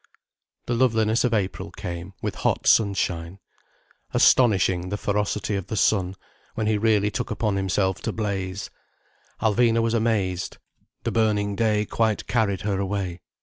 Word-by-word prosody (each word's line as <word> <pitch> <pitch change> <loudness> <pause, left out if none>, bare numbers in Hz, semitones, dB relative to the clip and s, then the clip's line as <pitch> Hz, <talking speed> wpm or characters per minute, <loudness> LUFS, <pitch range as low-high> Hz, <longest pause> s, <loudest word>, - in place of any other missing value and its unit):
The 120 - -1
loveliness 115 -2 +2
of 125 - +1
April 100 -4 -1
came, 85 +2 -7
with - - -3
hot - - 0
sunshine. 95 -4 +2 0.8
Astonishing 95 -7 +4
the 105 - -2
ferocity 105 0 -1
of 95 -3 -4
the - - -4
sun, 95 -2 +2 0.4
when 110 - -1
he 105 -1 +1
really 105 -1 +2
took - - -3
upon 105 -1 -1
himself 95 0 0
to - - -2
blaze. 100 -2 -3 0.7
Alvina 115 +1 +3
was 115 0 +1
amazed. 105 -5 0 0.5
The - - -1
burning 105 -2 +1
day 105 -1 +1
quite 110 -1 0
carried 105 -5 0
her 100 -2 -1
away. 95 -3 -3
105 Hz, 145 wpm, -24 LUFS, 95-110 Hz, 0.8 s, Astonishing